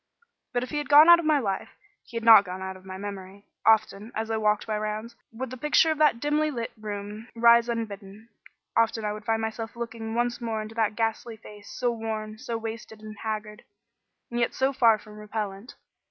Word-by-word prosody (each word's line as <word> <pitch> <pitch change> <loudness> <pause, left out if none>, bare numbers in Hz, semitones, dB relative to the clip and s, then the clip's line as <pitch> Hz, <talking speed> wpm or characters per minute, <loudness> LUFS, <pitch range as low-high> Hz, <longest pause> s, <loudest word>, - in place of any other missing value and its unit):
But 245 0 -1
if 255 - -7
he 295 - -1
had 295 - -6
gone 300 +3 +8
out 345 0 +9
of 340 - -4
my 310 -1 +4
life, 200 -8 -2 0.3
he 235 - -8
had 230 - -4
not 225 -3 +9
gone 185 -1 -7
out 190 0 -5
of 185 - -15
my 185 0 -7
memory. 200 0 -8 0.2
Often, 220 0 +3
as 220 +1 -3
I 220 - 0
walked 210 0 +1
my 215 - -1
rounds, 215 +2 -4 0.2
would 245 +2 -6
the 255 - -6
picture 300 +4 +3
of 310 - -3
that 300 -6 +4
dimly 300 +3 +1
lit 235 -5 -4
room 210 +1 -7
rise 235 0 +5
unbidden. 215 -1 -6 0.5
Often 225 -1 +2
would 210 - -7
I - - -27
find 225 0 +1
myself 225 +1 -4
looking 230 -1 -5
once 240 +1 -1
more 225 -2 -2
into 215 +1 -6
that 220 -2 0
ghastly 225 0 -2
face, 205 -1 -13
so 245 -1 -1
worn, 220 -1 -5
so 230 0 -4
wasted 225 -1 -7
and 215 0 -9
haggard, 215 -1 -5 0.7
and 240 - -2
yet 235 - 0
so 265 +1 +1
far 230 -4 +5
from 210 0 -13
repellent. 210 +1 -5
225 Hz, 210 wpm, -26 LUFS, 210-235 Hz, 0.7 s, out